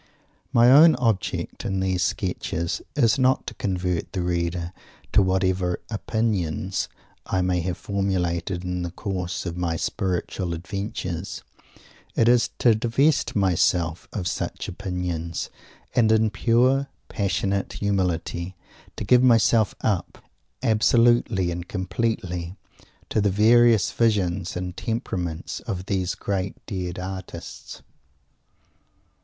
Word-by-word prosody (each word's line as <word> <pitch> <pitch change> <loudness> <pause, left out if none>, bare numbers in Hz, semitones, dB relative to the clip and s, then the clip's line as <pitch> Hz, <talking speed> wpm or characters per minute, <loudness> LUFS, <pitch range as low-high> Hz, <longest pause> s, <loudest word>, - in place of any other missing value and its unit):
My 120 -1 +6
own 155 +4 +8
object 110 -8 -1
in 95 -1 -1
these 95 -1 0
sketches 90 -3 -2
is 120 -4 +3
not 130 0 +3
to - - -5
convert 90 -3 -2
the 95 -2 -1
reader 85 0 -2 0.4
to - - +6
whatever 95 -1 +1
"opinions" 100 -5 -1 0.4
I 95 -1 +1
may 90 -1 +1
have 90 +1 -2
formulated 90 -3 -1
in 90 0 -2
the 85 - -3
course 90 -1 -4
of 85 -1 -4
my 85 -2 0
spiritual 90 0 -2
adventures; 95 0 -5 0.7
it 115 - +3
is 120 -1 +4
to 120 - +5
divest 120 +7 +1
myself 90 -3 +1
of 95 -5 -3
such - - -3
"opinions," 90 -3 -4 0.4
and 110 -3 +4
in 110 -1 +3
pure, 125 +6 +3 0.2
passionate 100 -1 -1
humility 90 -2 -1 0.4
to - - -4
give 125 +5 +5
myself 115 -3 +4
up, 95 -5 -1 0.5
absolutely 115 -4 +3
and 85 +1 -5
completely, 95 -3 -2 0.5
to 110 - +1
the 100 - +3
various 110 +1 +5
visions 95 -6 0
and 90 0 -4
temperaments 90 -7 -3
of 95 -5 -5
these 95 -3 -1
great 95 -1 -2
dead 90 -3 -4
artists. 95 0 -7
95 Hz, 115 wpm, -24 LUFS, 90-110 Hz, 0.7 s, own